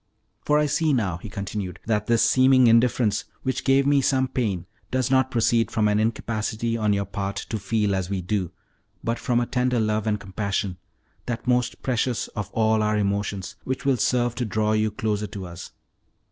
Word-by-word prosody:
"For 150 Hz, -, +3 dB
I 150 Hz, -, +3 dB
see 150 Hz, +1 st, +1 dB
now," 100 Hz, -9 st, 0 dB
he 105 Hz, -, -9 dB
continued, 100 Hz, -2 st, -5 dB
"that 105 Hz, -2 st, 0 dB
this 115 Hz, -1 st, +3 dB
seeming 130 Hz, +2 st, +5 dB
indifference, 115 Hz, -1 st, +3 dB, 0.2 s
which 130 Hz, 0 st, -2 dB
gave 135 Hz, 0 st, +3 dB
me 140 Hz, 0 st, +4 dB
some 130 Hz, 0 st, +2 dB
pain, 105 Hz, -9 st, -2 dB, 0.2 s
does 130 Hz, 0 st, 0 dB
not 130 Hz, -1 st, +3 dB
proceed 115 Hz, -1 st, +2 dB
from 110 Hz, -1 st, +1 dB
an 105 Hz, 0 st, +2 dB
incapacity 115 Hz, +1 st, -1 dB
on 105 Hz, -2 st, +1 dB
your 100 Hz, -1 st, 0 dB
part 100 Hz, +1 st, -4 dB
to 110 Hz, -, -2 dB
feel 105 Hz, 0 st, 0 dB
as 95 Hz, -1 st, -2 dB
we 100 Hz, -1 st, -1 dB
do, 90 Hz, -1 st, -2 dB, 0.5 s
but 115 Hz, +1 st, -1 dB
from 120 Hz, -1 st, +1 dB
a 120 Hz, -, 0 dB
tender 125 Hz, 0 st, 0 dB
love 110 Hz, 0 st, 0 dB
and 105 Hz, -1 st, +1 dB
compassion 95 Hz, -1 st, -3 dB, 0.5 s
that 115 Hz, -1 st, -3 dB
most 125 Hz, -1 st, 0 dB
precious 125 Hz, -2 st, 0 dB
of 105 Hz, -3 st, -5 dB
all 110 Hz, -1 st, +2 dB
our 105 Hz, 0 st, +1 dB
emotions, 100 Hz, -1 st, -2 dB
which 130 Hz, +1 st, -4 dB
will 135 Hz, -2 st, +3 dB
serve 120 Hz, +1 st, +1 dB
to 125 Hz, -, -3 dB
draw 110 Hz, 0 st, 0 dB
you 110 Hz, 0 st, +2 dB
closer 105 Hz, 0 st, -2 dB
to 100 Hz, -2 st, -7 dB
us. 90 Hz, 0 st, -9 dB
110 Hz, 190 wpm, -24 LUFS, 100-125 Hz, 0.5 s, seeming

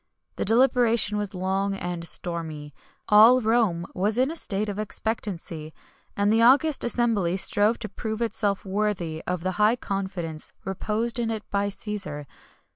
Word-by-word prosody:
The -, -, -1 dB
deliberation 230 Hz, -2 st, +3 dB
was 205 Hz, -2 st, -4 dB
long 195 Hz, +2 st, -1 dB
and 175 Hz, -3 st, -4 dB
stormy; 160 Hz, -5 st, -3 dB, 0.4 s
all 220 Hz, +4 st, +7 dB
Rome 220 Hz, -7 st, +1 dB
was 205 Hz, +4 st, 0 dB
in 260 Hz, +4 st, +2 dB
a -, -, -6 dB
state 210 Hz, -9 st, -2 dB
of 205 Hz, 0 st, -4 dB
expectancy; 185 Hz, -7 st, -3 dB, 0.4 s
and 205 Hz, +1 st, +2 dB
the 225 Hz, -, +3 dB
august 275 Hz, +5 st, +4 dB
assembly 225 Hz, -7 st, 0 dB
strove 205 Hz, +3 st, +3 dB
to 220 Hz, -, -6 dB
prove 220 Hz, 0 st, -5 dB
itself 205 Hz, -4 st, -1 dB
worthy 190 Hz, -5 st, -2 dB
of 180 Hz, -1 st, -2 dB
the 185 Hz, 0 st, -3 dB
high 215 Hz, +3 st, +5 dB
confidence 190 Hz, -8 st, -4 dB
reposed 215 Hz, +5 st, -2 dB
in 230 Hz, -1 st, -1 dB
it 220 Hz, -2 st, -3 dB
by 200 Hz, 0 st, 0 dB
Cæsar. 195 Hz, -8 st, -5 dB
205 Hz, 150 wpm, -25 LUFS, 180-225 Hz, 0.4 s, all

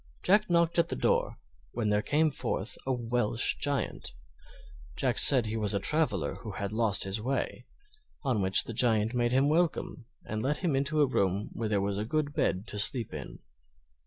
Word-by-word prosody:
Jack 205 Hz, +2 st, +3 dB
knocked 170 Hz, 0 st, +2 dB
at 170 Hz, -, +2 dB
the -, -, -3 dB
door, -, -, 0 dB, 0.4 s
when 115 Hz, -3 st, -1 dB
there 105 Hz, 0 st, +1 dB
came 150 Hz, +6 st, +1 dB
forth 110 Hz, -5 st, -2 dB
a -, -, +1 dB
Welsh 120 Hz, -2 st, 0 dB
Giant. 140 Hz, -1 st, -3 dB, 0.8 s
Jack -, -, +1 dB
said 130 Hz, -4 st, +7 dB
he 110 Hz, +1 st, -3 dB
was 105 Hz, -2 st, 0 dB
a -, -, +1 dB
traveler 105 Hz, -, 0 dB
who -, -, -7 dB
had 100 Hz, 0 st, -4 dB
lost 110 Hz, -3 st, 0 dB
his 95 Hz, +3 st, -3 dB
way, 125 Hz, 0 st, -3 dB, 0.6 s
on 125 Hz, -7 st, 0 dB
which 95 Hz, 0 st, +6 dB
the 115 Hz, -, -7 dB
Giant 110 Hz, -1 st, +2 dB
made 120 Hz, -1 st, 0 dB
him 135 Hz, +2 st, +3 dB
welcome 155 Hz, -6 st, -1 dB, 0.2 s
and 110 Hz, 0 st, -4 dB
let 145 Hz, +8 st, -2 dB
him 165 Hz, -6 st, +1 dB
into 140 Hz, +3 st, 0 dB
a -, -, +5 dB
room 100 Hz, -4 st, -1 dB
where 110 Hz, -1 st, -3 dB
there 100 Hz, -2 st, +1 dB
was 100 Hz, 0 st, -2 dB
a -, -, -2 dB
good 145 Hz, +5 st, -2 dB
bed 95 Hz, -6 st, -1 dB
to 105 Hz, -, -4 dB
sleep 115 Hz, +2 st, +2 dB
in. -, -, -8 dB
120 Hz, 190 wpm, -29 LUFS, 105-145 Hz, 0.8 s, said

